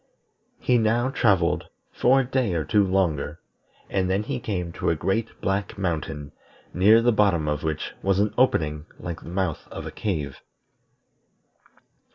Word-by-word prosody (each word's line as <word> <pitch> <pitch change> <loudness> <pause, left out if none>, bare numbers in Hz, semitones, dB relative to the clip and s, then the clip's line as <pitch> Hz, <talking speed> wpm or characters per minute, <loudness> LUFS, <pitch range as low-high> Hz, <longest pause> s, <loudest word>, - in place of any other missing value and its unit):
He 125 -1 +3
now 120 +4 +2
travelled 95 -9 +2 0.3
for 135 +2 +4
a - - -3
day 125 -7 0
or 80 - 0
two 105 -2 +3
longer, 85 -5 0 0.5
and 95 -1 0
then 95 +2 +1
he 125 +3 -3
came 90 -7 -3
to - - -2
a 85 - +2
great 105 +8 -2
black 100 +1 -1
mountain, 80 -5 -3 0.4
near 105 +6 +5
the 120 - +4
bottom 100 -8 +2
of 75 -1 -1
which 80 -1 -3
was 95 -1 +2
an 105 +1 +1
opening 75 - +1
like 85 -1 -6
the - - -10
mouth 90 -3 -2
of - - -7
a - - -5
cave. 75 -10 -3
95 Hz, 160 wpm, -25 LUFS, 80-110 Hz, 0.5 s, near